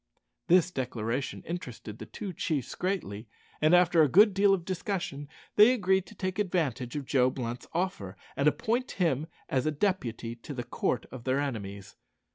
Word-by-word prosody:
This 180 0 +5
declaration 125 -2 -3
interested 125 -10 -6
the - - -8
two 200 -4 -6
chiefs 150 -4 -2
greatly, 120 - -3 0.3
and 155 +3 +6
after 175 -2 +5
a 150 - +5
good 205 - +6
deal 200 +1 +4
of 185 -4 +1
discussion 180 -6 -3 0.3
they 215 +4 +8
agreed 190 -4 +1
to 210 - -13
take 185 0 -3
advantage 145 - -1
of 145 -2 -3
Joe 130 -1 +3
Blunt's 120 -1 -5
offer; 165 - -2 0.2
and 140 - +2
appoint 235 - 0
him 160 -5 0 0.2
as 130 +2 0
a - - +2
deputy 135 - -1
to 140 +4 -8
the 120 - -3
court - - -1
of 125 -2 -8
their 130 +2 +1
enemies. 100 -8 -5
150 Hz, 170 wpm, -29 LUFS, 125-185 Hz, 0.3 s, they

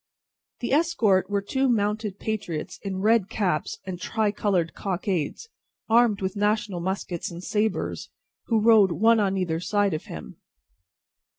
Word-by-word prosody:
The 240 - -2
escort 280 - +2
were 200 -1 0
two 265 +5 0
mounted 210 -2 0
patriots 195 -9 -4
in 190 -2 -4
red 215 -2 +3
caps 180 -8 -1
and 180 -1 -6
tri 220 -2 0
coloured 185 -6 0
cockades, 190 - -3 0.4
armed 230 -3 +4
with 190 +1 -2
national 210 -2 0
muskets 180 -1 -3
and 175 +1 -9
sabres, 215 +2 -1 0.4
who 225 -2 +2
rode 210 -5 +5
one 225 +4 +4
on 195 -2 +1
either 170 -3 -1
side 205 +1 +1
of 155 - -4
him. 75 -6 -9
205 Hz, 140 wpm, -25 LUFS, 185-220 Hz, 0.4 s, rode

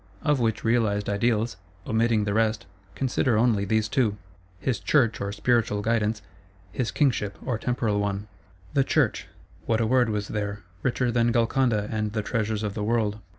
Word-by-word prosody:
Of 145 -2 +2
which 115 -2 0
realised 110 -3 +1
ideals, 110 0 0 0.3
omitting 110 -1 +2
the 100 0 -1
rest, 110 +1 +1 0.3
consider 130 -3 +1
only 110 -3 +2
these 110 +2 +1
two: 110 -3 +1 0.4
his 110 +4 -1
Church, 120 -7 +2
or 100 0 -2
spiritual 105 -1 +1
Guidance; 110 -1 0 0.5
his 125 +1 -2
Kingship, 115 -9 0
or 125 -4 -1
temporal 115 -4 0
one. 100 0 -2 0.5
The 135 - +4
Church: - - +1 0.4
what 110 -1 +2
a 115 - +2
word 125 0 +3
was 105 -1 -2
there; 105 -1 -3 0.2
richer 125 0 0
than 120 0 +2
Golconda 115 -2 +1
and 110 -1 -2
the 110 -1 -1
treasures 110 -1 -1
of 105 -2 -2
the 105 - -3
world! 110 -1 0
110 Hz, 165 wpm, -26 LUFS, 105-120 Hz, 0.5 s, The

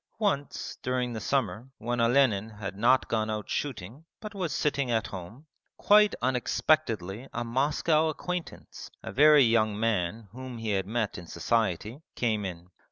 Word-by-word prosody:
Once 190 - -2
during 125 -1 -1
the 110 - -4
summer, 130 -1 -1
when 120 +1 -2
Olenin 115 -4 +3
had 105 -2 -7
not 120 +6 +3
gone 110 -1 0
out 105 -1 -3
shooting 125 - -4 0.2
but 215 -1 -8
was 185 -6 -3
sitting 140 -1 0
at 115 -2 +1
home, 100 - -9 0.3
quite 210 0 +5
unexpectedly 125 - 0
a 120 - -2
Moscow 150 +6 +1
acquaintance, 180 +2 -6
a - - -6
very 150 +1 +7
young 110 -3 +2
man 110 -1 -1
whom 130 +1 -8
he 115 -1 -3
had 95 -2 0
met 110 -3 -2
in 85 - -11
society, 110 - -1
came 110 -4 0
in. 90 -1 -7
120 Hz, 155 wpm, -28 LUFS, 105-140 Hz, 0.3 s, very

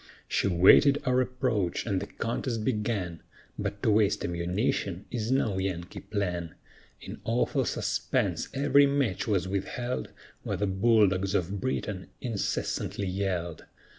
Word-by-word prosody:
She - - +1
waited 100 +10 +6
our 130 0 +3
approach, 125 -8 -1
and 100 -4 0
the 100 - -5
contest 115 -1 -3
began, 105 -8 -1 0.4
But 100 - -4
to 110 - +4
waste 105 -1 +2
ammunition 90 +2 -1
is 115 -2 -2
no 115 -7 +1
Yankee 90 -2 -3
plan; 90 -5 -3 0.5
In - - -9
awful - - +1
suspense - - -1
every 140 +1 +4
match 140 -10 0
was 95 -4 +1
withheld, 120 +6 -3 0.3
While - - -3
the 105 - 0
bull 105 +2 +4
dogs 95 +1 -1
of 95 +2 -1
Britain 105 -7 -3
incessantly 105 -3 -2
yelled. 90 -3 -2
100 Hz, 135 wpm, -28 LUFS, 95-120 Hz, 0.5 s, waited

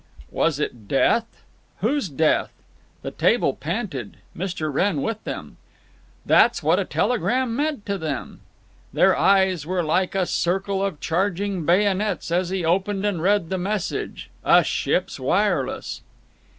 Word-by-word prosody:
Was 165 -4 +1
it 120 -8 -4
death? 225 - +1 0.4
Whose 285 -10 0
death? 155 +2 +1 0.5
The - - -4
table - - +2
panted, 160 - -4 0.2
Mr. 165 -4 -3
Wrenn 160 -1 +1
with 225 -1 -3
them…. - - -6 0.7
That's - - +4
what - - +3
a - - -1
telegram 250 0 0
meant 290 -4 -2
to 200 -1 -2
them. 155 -5 -5 0.5
Their - - +4
eyes 190 -4 +3
were 180 -1 0
like 180 +5 0
a 190 -2 +2
circle 195 +3 -1
of 195 -7 -2
charging 190 0 -1
bayonets 195 0 +1
as 175 +1 +1
he 185 -2 -2
opened 195 +4 0
and 195 -6 -1
read 195 -2 +2
the 190 - -1
message—a 200 +1 0
ship's - - -1
wireless. - - 0
190 Hz, 135 wpm, -23 LUFS, 165-205 Hz, 0.7 s, That's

